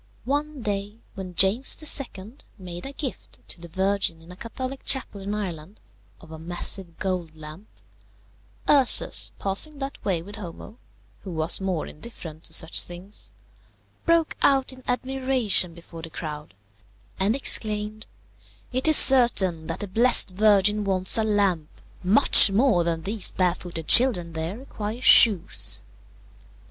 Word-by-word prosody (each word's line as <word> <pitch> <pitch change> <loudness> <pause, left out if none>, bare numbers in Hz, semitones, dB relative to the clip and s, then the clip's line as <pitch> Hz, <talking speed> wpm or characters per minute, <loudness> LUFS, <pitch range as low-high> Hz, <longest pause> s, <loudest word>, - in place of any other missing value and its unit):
One 290 0 -4
day, 205 0 -4 0.2
when 185 -2 -9
James 195 +9 +3 0.4
II. 210 +8 -12 0.2
made 180 +1 -8
a - - -7
gift 275 -2 -7
to 170 - -7
the 170 - -9
Virgin 190 -1 -2
in 165 +2 -15
a - - -11
Catholic 255 +6 -8
chapel 255 -7 -1
in 200 +2 -5
Ireland 185 -2 -7 0.4
of 160 - -17
a 160 - -10
massive 175 +1 -4
gold 180 -4 -4
lamp, 155 +6 -12 1.0
Ursus, 275 -4 +4
passing 205 +10 -1
that 275 0 -8
way 175 -5 -2
with 205 +4 -11
Homo, 205 +4 -11 0.4
who 195 - -11
was 160 +1 0
more 185 -4 -3
indifferent 160 -4 -11
to - - -5
such 160 - +2
things, 180 +4 -7 0.7
broke 335 -2 +1
out 270 -1 +1
in 260 0 -16
admiration 255 -8 0
before 170 -1 -13
the 165 - -9
crowd, 150 -7 -9 0.6
and 200 +5 +1
exclaimed, 215 -4 0 0.6
"It 260 +3 0
is 315 - +9
certain 195 -11 +5
that - - -6
the 205 - -5
blessed 230 +1 +4
Virgin 210 +1 +2
wants 190 -2 +2
a - - +1
lamp 200 -7 -1 0.3
much 200 +2 +5
more 205 -3 +1
than 165 -1 -3
these 205 +1 +1
barefooted 175 -3 -3
children 195 -10 +3
there 160 +5 -5
require 225 -3 -7
shoes." 210 -8 +4
195 Hz, 140 wpm, -23 LUFS, 175-235 Hz, 1.0 s, is